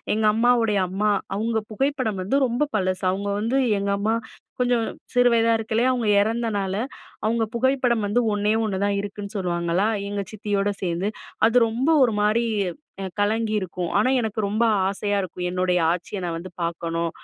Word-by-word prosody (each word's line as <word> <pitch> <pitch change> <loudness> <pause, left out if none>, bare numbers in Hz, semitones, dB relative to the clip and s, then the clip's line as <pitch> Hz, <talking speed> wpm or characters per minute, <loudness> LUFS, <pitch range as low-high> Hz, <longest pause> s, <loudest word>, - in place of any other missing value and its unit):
எங்க 220 0 +1
அம்மாவுடைய 230 -2 +3
அம்மா, 205 +3 +1 0.2
அவுங்க 225 +2 0
புகைப்படம் 255 -6 -1
வந்து 200 +9 0
ரொம்ப 245 +4 0
பழசு. 185 -1 -1
அவுங்க 200 +2 -3
வந்து 230 +5 0 0.2
எங்க 200 0 -1
அம்மா 220 +3 +1 0.4
கொஞ்சம் 245 -2 +2 0.3
சிறு 245 -1 +5
வயசா 230 0 +4
இருக்கயிலே 225 +2 0
அவுங்க 245 -3 -1
இறந்தனால, 210 -3 -1 0.5
அவுங்க 225 +1 +1
புகைப்படம் 250 -2 +2
வந்து 205 +4 +2
ஒன்னே 205 +1 +1
ஒண்ணு 205 -3 -1
தான் 200 0 0
இருக்குன்னு 205 +1 -7
சொல்லுவாங்களா, 175 +1 0 0.2
எங்க 205 0 -2
சித்தியோட 205 -1 -1
சேர்ந்து. 175 +2 -1 0.4
அது 230 - -1
ரொம்ப 240 +7 -1 0.2
ஒரு 230 - -1
மாரி 215 +3 +2 0.7
கலங்கியிருக்கும். 205 -4 0
ஆனா 215 +5 +3
எனக்கு 220 -1 -3
ரொம்ப 210 +3 0 0.2
ஆசையா 205 +1 -1
இருக்கும் 180 -1 -5
என்னுடைய 180 0 +1
ஆச்சியை 180 +3 -4
நான் 170 -1 -2
வந்து 170 +3 -7
பார்க்கணும். 170 0 -2
210 Hz, 155 wpm, -23 LUFS, 190-230 Hz, 0.7 s, சிறு